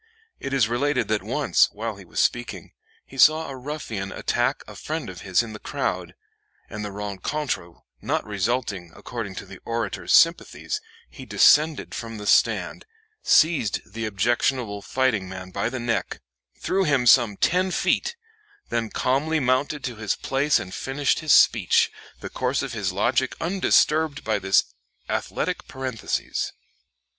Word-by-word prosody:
It 135 - -5
is 135 -5 +3
related 125 -1 0
that 110 -1 +1
once, - - +2
while - - -5
he - - -12
was - - -5
speaking, - - -1 0.3
he 135 - -12
saw 155 +3 +5
a 135 - -6
ruffian 125 -8 -5
attack - - -1
a - - -10
friend - - -4
of - - -11
his 95 +4 +2
in 110 -2 -8
the 105 - -8
crowd, - - -3 0.6
and 105 0 -5
the 105 - -4
rencontre 100 - -4 0.3
not - - -1
resulting 105 -3 -2
according 105 -6 -6
to - - -7
the 95 - -12
orator's 115 -3 -3
sympathies, 175 - +3 0.3
he - - -12
descended 155 0 +4
from 115 -1 -6
the 105 - -7
stand, 105 - +2 0.3
seized 155 - +2
the 115 0 -3
objectionable 110 +1 0
fighting 115 -6 0
man 95 0 -8
by 110 - -1
the 130 +1 -4
neck, 120 0 -2 0.4
"threw 195 +1 +1
him 140 -7 +2
some 115 -5 +5
ten 185 +2 +2
feet," 325 - 0 0.5
then 115 -1 -1
calmly 145 +8 0
mounted 135 +2 0
to 125 -4 -4
his 110 -2 -1
place 140 +2 +1
and 95 0 -6
finished 135 +2 0
his 155 -2 0
speech, 105 -7 +5 0.3
the - - -6
course 130 +1 -1
of 130 - -5
his 100 -5 -1
logic 120 +7 +1
undisturbed 160 -4 +2
by 110 -2 0
this 95 0 +3 0.4
athletic - - -2
parenthesis. 130 -4 -3
120 Hz, 150 wpm, -24 LUFS, 105-140 Hz, 0.6 s, saw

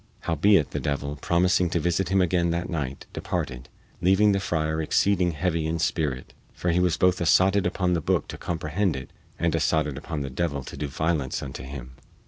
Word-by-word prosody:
Howbeit, 80 0 +3
the - - -2
devil, 70 0 -2
promising 90 +4 +2
to 85 - 0
visit 85 +3 0
him 95 0 +3
again 85 -1 +2
that 85 +2 -2
night, 70 -5 -4
departed, 60 -1 -4 0.3
leaving 95 +4 +4
the 100 - +1
friar 80 -4 -1
exceeding 90 +2 +2
heavy 80 0 -1
in 80 +1 -1
spirit, 75 -5 -1 0.2
for 90 - 0
he 85 - +2
was 90 -2 +2
both 90 0 +3
assotted 95 +3 +4
upon 90 0 0
the 85 - 0
booke - - 0
to - - -6
comprehend 85 +2 -1
it 65 -1 -7 0.3
and - - 0
assotted 75 -4 +1
upon 80 -3 -4
the 70 -1 -4
devil 70 -1 -2
to - - -9
do 75 - -3
violence 75 -1 -1
unto 65 -1 -6
him. 65 -1 -8
85 Hz, 190 wpm, -25 LUFS, 75-90 Hz, 0.3 s, leaving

